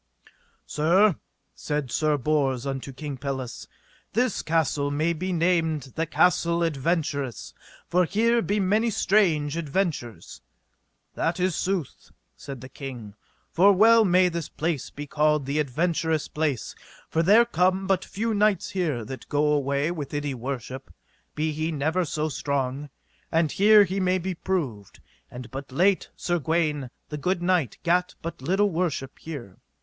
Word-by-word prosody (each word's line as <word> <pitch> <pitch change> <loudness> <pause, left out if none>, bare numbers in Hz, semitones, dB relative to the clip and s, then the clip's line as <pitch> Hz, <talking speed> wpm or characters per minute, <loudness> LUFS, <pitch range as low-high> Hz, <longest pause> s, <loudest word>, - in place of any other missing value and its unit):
Sir, 175 +5 +3 0.4
said 150 -4 -3
Sir 155 -1 +1
Bors 135 -2 0
unto 135 0 -4
King 140 0 -6
Pelles, 130 -2 -5 0.5
this 245 -1 +1
castle 155 -3 0
may 155 +4 0
be 185 +3 -3
named 165 -6 0
the 165 0 -2
Castle 170 0 +2
Adventurous, 145 - -2 0.3
for 180 +1 +3
here 230 +6 +2
be 210 -1 0
many 210 +4 +2
strange 170 -9 +2
adventures. 155 - -3 0.7
That 165 +3 -1
is 180 -2 +1
sooth, 185 -7 -3 0.3
said 135 -3 -9
the 130 - -8
king, 125 -6 -8 0.4
for 195 +4 +5
well 225 +4 +6
may 185 -2 +4
this 170 -3 -4
place 160 -3 -2
be 145 - -7
called 150 0 +1
the 140 +3 -1
adventures 160 +2 0
place, 150 -6 -2 0.3
for 160 - 0
there 210 +8 +6
come 185 -3 +1
but 190 -1 +1
few 225 +2 -2
knights 205 -2 +2
here 155 - -1
that 130 +4 -9
go 150 +1 +2
away 140 +2 +1
with 150 -4 -5
any 145 -1 -2
worship; 130 +1 -6 0.4
be 155 +1 0
he 155 +2 -2
never 160 +4 0
so 155 0 -2
strong, 140 -1 -2 0.6
here 210 +1 +6
he 195 +1 -2
may 185 0 +2
be 185 +1 -3
proved; 145 - -3 0.3
and 125 -2 -9
but 135 0 -7
late 185 +8 +2
Sir 175 -1 -1
Gawaine, 155 -4 0 0.2
the 150 - -4
good 180 +3 -1
knight, 175 - +1
gat 180 +1 +1
but 165 -4 -6
little 195 +8 +1
worship 160 -6 -2
here. 135 - -8
160 Hz, 145 wpm, -25 LUFS, 140-185 Hz, 0.7 s, well